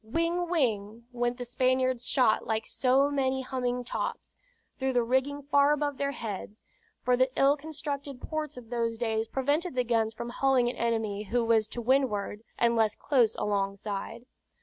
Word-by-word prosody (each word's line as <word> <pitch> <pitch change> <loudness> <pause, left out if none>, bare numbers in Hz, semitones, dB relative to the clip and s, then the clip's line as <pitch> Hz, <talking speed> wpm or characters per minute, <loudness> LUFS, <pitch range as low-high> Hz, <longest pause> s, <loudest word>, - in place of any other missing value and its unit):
"Whing, 335 +8 -1
whing," 230 - -1
went 240 0 -1
the 245 - -5
Spaniard's 255 0 +1
shot 250 -5 +3
like 220 0 -1
so 270 +2 +2
many 265 -2 0
humming 250 -1 -2
tops, 245 - -4 0.4
through 265 0 0
the 245 -1 +3
rigging 265 +4 0
far 285 +1 +4
above 290 -2 -1
their 280 - 0
heads; 210 -3 -6 0.4
for 250 +1 +3
the 255 +1 +3
ill 275 +1 +5
constructed 285 -3 -6
ports 305 -2 -4
of 240 -2 -11
those 230 -1 -1
days 225 -1 -1
prevented 290 +6 0
the 250 - +2
guns 225 -2 0
from 235 +2 -5
hulling 260 -1 +2
an - - -11
enemy 220 -3 -1
who 235 +3 0
was 225 -2 +3
to 240 +2 -6
windward, 225 -5 +1 0.2
unless 230 -2 +2
close 245 -7 +2
alongside. 200 +3 -3
245 Hz, 165 wpm, -29 LUFS, 225-275 Hz, 0.4 s, ill